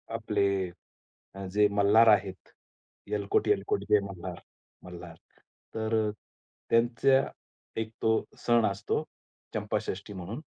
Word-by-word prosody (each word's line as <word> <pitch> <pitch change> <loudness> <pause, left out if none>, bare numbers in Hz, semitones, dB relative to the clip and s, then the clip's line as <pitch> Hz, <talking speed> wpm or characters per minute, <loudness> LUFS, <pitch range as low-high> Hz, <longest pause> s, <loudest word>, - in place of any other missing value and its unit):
आपले 105 -3 0 0.9
अ, 100 0 -6
जे 105 0 +5
मल्हार 105 +3 +5
आहेत, 95 -3 +1 0.6
येळकोट, 100 -1 0
येळकोट 415 0 +1
जय 105 - +6
मल्हार. 90 -1 -7 0.4
मल्हार, 90 -2 -10 0.6
तर 110 -1 +1 0.6
त्यांचा 120 +3 +4 0.6
एक 110 0 -5
तो 110 0 +2
सण 120 -2 +3
असतो 100 - -1 0.5
चंपाषष्ठी 100 +2 -3
म्हणून. 95 - -6
105 Hz, 100 wpm, -29 LUFS, 100-115 Hz, 0.9 s, जय